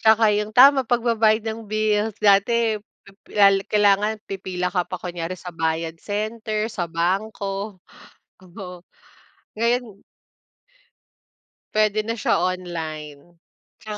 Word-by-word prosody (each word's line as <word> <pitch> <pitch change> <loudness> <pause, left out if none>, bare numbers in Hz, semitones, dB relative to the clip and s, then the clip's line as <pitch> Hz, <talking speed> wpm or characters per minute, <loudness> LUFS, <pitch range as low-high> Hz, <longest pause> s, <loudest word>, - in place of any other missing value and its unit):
Tsaka 220 0 +5
yung 210 +1 -3
tama 270 +1 +7
pagbabayad 225 -2 +2
ng 220 +1 -3
bills. 215 0 0
Dati 215 +2 +3 0.2
pip 195 +1 -19 0.2
la 200 -1 +7 0.2
kailangan 210 +1 +2
pipila 180 -2 -3
ka 180 -1 -1
pa 185 - -5
kunyari 175 0 -4
sa 180 0 -9
bayad 165 0 -2
center, 215 +2 -3
sa 175 -4 -3
bangko. 195 +3 -3 0.6
Oo, 180 -1 -10 0.7
ngayon 235 +2 +1 1.9
Pwede 215 0 +2
na 230 0 -4
siya - - +2
online, 165 -3 -5 0.4
tsaka 210 -1 -7
205 Hz, 110 wpm, -22 LUFS, 180-220 Hz, 1.9 s, tama